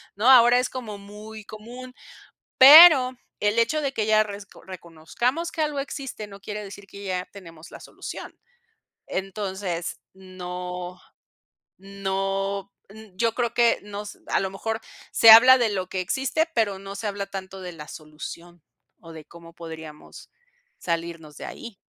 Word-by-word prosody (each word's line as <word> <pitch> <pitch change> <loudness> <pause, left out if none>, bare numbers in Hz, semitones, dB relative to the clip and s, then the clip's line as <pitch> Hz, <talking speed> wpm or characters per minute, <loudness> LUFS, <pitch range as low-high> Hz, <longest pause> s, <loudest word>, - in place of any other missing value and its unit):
¿no? 215 +6 +2
Ahora 245 -1 +7
es 250 - -1
como 225 -6 -7
muy 210 +2 -11
común, 240 +5 -11 0.6
pero 275 -1 +10 0.3
el 210 +2 +1
hecho 235 +7 +1
de 280 -2 -2
que 220 -5 -2
ya 215 0 +4
resco 200 -1 -11
reconozcamos 190 - -4
que 320 - -4
algo 300 -2 -1
existe, 275 -6 -6
no 200 -1 -13
quiere 210 +1 -7
decir 200 0 -11
que 200 - -12
ya 185 -2 -3
tenemos 165 -5 -13
la - - -11
solución. - - -9 0.7
Entonces, 190 -3 -4
no 180 -1 -8 0.8
no 195 0 -3 0.2
n 220 -1 -14
yo 230 +2 +1
creo 235 -2 -2
que 235 -1 +3
nos 205 0 -8
a - - +1
lo 190 - -3
mejor, 220 +3 -4 0.3
se 225 - +7
habla 250 +4 +10
de 235 -4 +1
lo 185 -2 -3
que 185 - -3
existe, 270 - -1
pero 205 -5 0
no 195 +1 -9
se 215 +2 -6
habla 200 -1 -3
tanto 190 -1 -8
de 180 -1 -7
la 150 -2 -11
solución, 165 +2 -10 0.4
o 165 -1 -13
de 160 -2 -11
cómo 170 +1 -15
podríamos 160 -2 -11 0.5
salirnos 165 -3 -5
de - - -9
ahí. 235 -3 -10
200 Hz, 155 wpm, -24 LUFS, 180-230 Hz, 0.8 s, pero